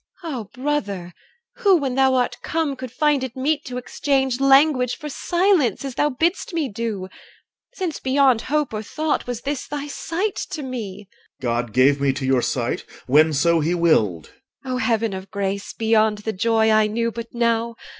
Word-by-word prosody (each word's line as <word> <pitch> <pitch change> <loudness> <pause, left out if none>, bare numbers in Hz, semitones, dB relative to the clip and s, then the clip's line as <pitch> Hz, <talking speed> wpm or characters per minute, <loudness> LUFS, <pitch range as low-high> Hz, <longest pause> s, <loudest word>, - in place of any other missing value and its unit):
EL. 330 - -4
Ah! 250 -5 -4 0.2
brother, 205 -12 -2 0.4
who, 405 -5 +4
when 275 -5 -2
thou 265 0 +3
art 245 -1 0
come, 320 -4 -1
Could 255 -2 -7
find 295 -1 +1
it 255 -2 -5
meet 290 +3 0
to 250 -1 -5
exchange 265 0 0
Language 270 -2 +4
for 300 - -7
silence, 345 - +1
as 270 - -4
thou 295 - +1
bidst 335 +6 -1
me 315 -4 0
do? 210 -3 -4 0.7
Since 360 -8 -3
beyond 265 -3 +3
hope 295 -1 -1
or 215 - -2
thought 305 +7 -2
Was 245 -2 -4
this 280 -1 -3
thy 290 -1 -4
sight 355 +7 -3
to 305 - -5
me. 210 -6 -6 0.3
OR. - - -20
God 120 -1 -1
gave 140 +3 +4
me 140 -1 +2
to 135 0 -4
your 130 -1 +3
sight 120 -1 -1 0.2
when 155 +5 +5
so 165 +3 +3
he 165 +3 0
willed. 110 - +1 0.3
EL. 255 - -3
O - - 0
heaven 225 -4 0
of 190 +1 -7
grace 200 0 -3
beyond 220 -1 +2
The 215 +1 -4
joy 220 +2 +2
I 215 0 +4
knew 230 +2 -1
but 230 0 -6
now! 235 0 +1
240 Hz, 185 wpm, -22 LUFS, 200-280 Hz, 0.7 s, when